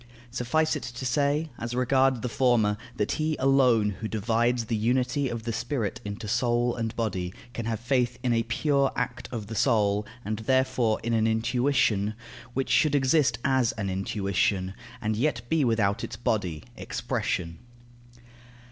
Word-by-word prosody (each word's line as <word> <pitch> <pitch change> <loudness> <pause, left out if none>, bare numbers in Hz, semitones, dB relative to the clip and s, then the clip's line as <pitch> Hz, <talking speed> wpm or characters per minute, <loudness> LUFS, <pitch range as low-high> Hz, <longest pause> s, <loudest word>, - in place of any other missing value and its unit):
Suffice 155 +7 +1
it 150 - -3
to 125 +1 -6
say, 145 +4 +1
as 115 +1 -4
regards 130 0 +2
the 125 - -2
former, 120 -4 +2 0.2
that 105 - 0
he 155 0 0
alone 125 -6 +4
who 110 - -3
divides 115 +2 +1
the 115 - -1
unity 125 +5 +1
of 115 -2 -4
the 115 0 -3
spirit 120 -2 -2
into 105 +2 -6
soul 120 +1 +1
and 115 -2 -3
body 95 -6 -2 0.2
can 115 0 -4
have 115 -2 -2
faith 125 0 0
in 125 -2 +2
a 115 - +2
pure 140 +4 +1
act 125 -1 -3
of 115 -4 -4
the 110 - -7
soul, 105 -3 +2 0.2
and 110 +1 -2
therefore 130 -2 +1
in 115 0 -1
an 110 -1 +3
intuition, 115 -2 +1 0.4
which 135 0 -1
should 150 -2 +4
exist 135 -3 +3
as 130 -4 +2
an 100 -3 -3
intuition, 95 -1 0 0.3
and 110 0 0
yet 120 0 0
be 160 -2 +2
without 110 -5 +1
its - - -5
body, 95 -9 -1
expression. 85 -2 -3
120 Hz, 160 wpm, -27 LUFS, 110-130 Hz, 0.4 s, alone